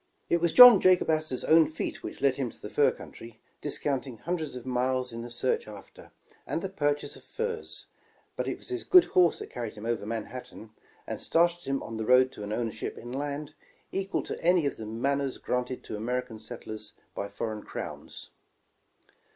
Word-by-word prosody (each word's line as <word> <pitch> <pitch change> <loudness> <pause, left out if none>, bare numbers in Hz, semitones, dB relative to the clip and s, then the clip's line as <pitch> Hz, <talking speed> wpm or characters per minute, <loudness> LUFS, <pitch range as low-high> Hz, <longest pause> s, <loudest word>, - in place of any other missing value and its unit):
It 170 - +3
was 170 -1 +2
John 245 -2 +11
Jacob 185 -3 +4
Astor 155 -4 0
's - - -4
own 160 0 +6
feet 160 - -4
which - - -7
led 135 -2 +3
him 135 -3 -1
to - - -14
the 105 - -8
fur 145 - +4
country, 115 -1 -10 0.2
discounting 135 -4 -2
hundreds 160 +1 -3
of 125 -1 -8
miles 130 0 0
in 115 - -5
the 120 - -7
search 120 0 -1
after, 105 -2 -12 0.4
and 165 - -2
the 195 - -2
purchase 145 -5 -1
of - - -14
furs; 460 -1 -4 0.5
but - - -2
it - - -2
was - - -12
his 370 -1 -2
good 365 -1 +8
horse 180 -3 +5
that - - -8
carried 120 -3 -5
him 105 +1 -8
over 115 -3 -2
Manhattan, 115 0 -6 0.3
and - - -5
started 170 +1 +2
him 135 0 -1
on 115 - -6
the 110 - -3
road 130 +1 +6
to - - -10
an 105 0 -5
ownership 115 0 -3
in 120 +1 -8
land, 145 +2 -4 0.4
equal 195 0 -1
to - - -6
any 175 -2 +4
of 140 - -1
the 110 - -7
manors 135 +4 -1
granted 125 0 -2
to - - -6
American 120 +1 -3
settlers 110 0 -7 0.2
by 100 - -4
foreign 110 +1 -4
CrowTis. - - -6
130 Hz, 195 wpm, -28 LUFS, 115-160 Hz, 0.5 s, John